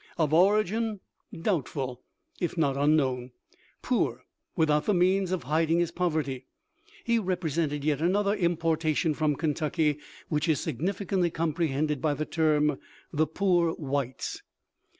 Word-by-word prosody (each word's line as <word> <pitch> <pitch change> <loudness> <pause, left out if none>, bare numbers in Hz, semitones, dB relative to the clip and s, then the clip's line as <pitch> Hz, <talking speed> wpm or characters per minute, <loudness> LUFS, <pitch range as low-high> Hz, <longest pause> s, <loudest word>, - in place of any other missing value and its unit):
Of 155 -3 +1
origin, 210 +4 +3 0.3
doubtful 140 - -2 0.4
if 175 0 -2
not 140 -4 +2
un 145 +2 +3
known; 130 -4 -1 0.5
"poor, - - 0 0.3
without 150 -1 +2
the 210 - +3
means 185 +1 +2
of 185 -6 -1
hiding 160 +4 +1
his 175 -1 +1
poverty," 150 -7 -2 0.6
he 235 0 +2
represented 165 -6 -1
yet 150 -1 0
another 200 +4 +2
importation 165 -4 +1
from 150 -1 +1
Kentucky 150 -1 0 0.3
which 150 +1 0
is 150 -4 +3
significantly 185 - -1
comprehended 155 -3 -1
by 150 -2 +1
the 155 +2 -2
term, 150 -3 +1 0.3
"the 155 +1 +2
poor 175 -1 +2
whites." 140 -4 -3
160 Hz, 130 wpm, -28 LUFS, 150-175 Hz, 0.6 s, origin